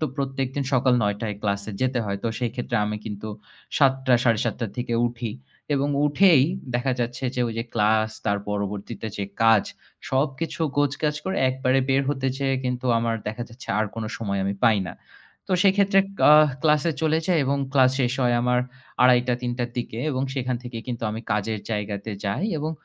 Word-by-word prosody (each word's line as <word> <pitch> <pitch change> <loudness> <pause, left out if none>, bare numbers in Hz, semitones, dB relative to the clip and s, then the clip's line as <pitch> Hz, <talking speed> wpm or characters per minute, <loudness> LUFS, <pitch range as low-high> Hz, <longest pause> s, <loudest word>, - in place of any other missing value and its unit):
তো - - +1
প্রত্যেকদিন 135 0 -2
সকাল 130 0 +3
৯ 105 -1 +1
টায় 105 -3 -3
ক্লাসে 100 +1 -1
যেতে 130 -1 +1
হয়। 100 -1 -3
তো 115 - +2
সেই 120 -2 -1
ক্ষেত্রে 125 -1 -2
আমি 105 0 -2
কিন্তু 105 0 -6 0.5
৭:০০-৭:৩০ 125 -4 +2
থেকে 120 -1 -2
উঠি 120 -1 -4 0.4
এবং 140 +1 +1 0.2
উঠেই 150 0 +5 0.3
দেখা 125 +2 +1
যাচ্ছে 120 +2 -3
যে 125 - -1
ওই - - -4
যে 115 - -2
ক্লাস 110 0 +2 0.2
তার 100 0 +1
পরবর্তীতে 100 +1 -4
যে 100 - -2 0.2
কাজ। 115 -3 +6 0.5
সবকিছু 135 +5 -1 0.2
গোছগাছ 145 +1 +1
করে 190 - -2
একবারে 130 0 +1
বের 135 +1 +3
হতে 135 -2 -1
চেয়ে 135 -1 0
কিন্তু 125 0 -2
আমার 115 0 0
দেখা 110 +3 -4
যাচ্ছে 120 +2 -13
আর 110 - +1
কোন 115 -1 -4
সময় 100 -3 -2
আমি 100 +1 -1
পাই 110 -4 +5
না। - - -7 0.5
তো - - -2
সেই 195 -2 +6
ক্ষেত্রে 200 -1 +4 0.3
আ - - +9 0.3
ক্লাসে 150 +1 +3
চলে 160 0 +3
যাই 180 -3 +3
এবং 140 +1 0
ক্লাস 130 -2 +5
শেষ 120 -2 +1
হয় 120 -1 +3
আমার 125 0 +2 0.4
২:৩০-৩:০০ 125 0 +2
র - - -16
দিকে 120 -2 -4
এবং 130 -2 -1
সেখান 130 -2 -1
থেকে 120 -2 -6
কিন্তু 120 -2 -5
আমি 110 +1 -4
কাজের 105 +1 -1
জায়গাতে 105 0 -3
যাই 100 - -1
এবং 155 +2 -2
125 Hz, 180 wpm, -24 LUFS, 110-135 Hz, 0.5 s, আ